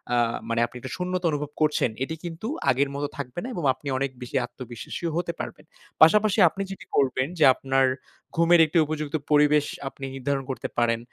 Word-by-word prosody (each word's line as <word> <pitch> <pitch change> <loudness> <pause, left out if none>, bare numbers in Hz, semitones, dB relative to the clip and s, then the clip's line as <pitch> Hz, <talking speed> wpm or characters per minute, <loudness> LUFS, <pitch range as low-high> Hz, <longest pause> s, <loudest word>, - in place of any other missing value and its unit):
আ - - +3 0.3
মানে 115 0 0
আপনি 125 - -13
একটা 130 +6 -6
শূন্যতা 180 0 -2
অনুভব 150 -1 -3
করছেন, 150 -4 +2
এটি 160 +4 -4
কিন্তু 175 +4 -5 0.2
আগের 140 +2 +2
মতো 145 +1 -2
থাকবে 140 +2 -5
না - - -4
এবং 175 - -4
আপনি 145 - -12
অনেক 135 0 -1
বেশি 125 +2 -7
আত্মবিশ্বাসী 120 +4 -8
হতে 170 -1 -1
পারবেন। - - -7 0.4
পাশাপাশি 210 +6 +6
আপনি 195 - -6
যেটি 195 - -8
করবেন 130 -1 +2
যে, - - +5
আপনার 135 0 +2 0.5
ঘুমের 170 +1 +5
একটি 155 +3 -1
উপযুক্ত 150 0 -3 0.2
পরিবেশ 150 0 +5 0.2
আপনি 135 - -8
নির্ধারণ 135 +1 -2
করতে 130 - -3
পারেন। 115 -1 +2
145 Hz, 185 wpm, -25 LUFS, 130-165 Hz, 0.5 s, পাশাপাশি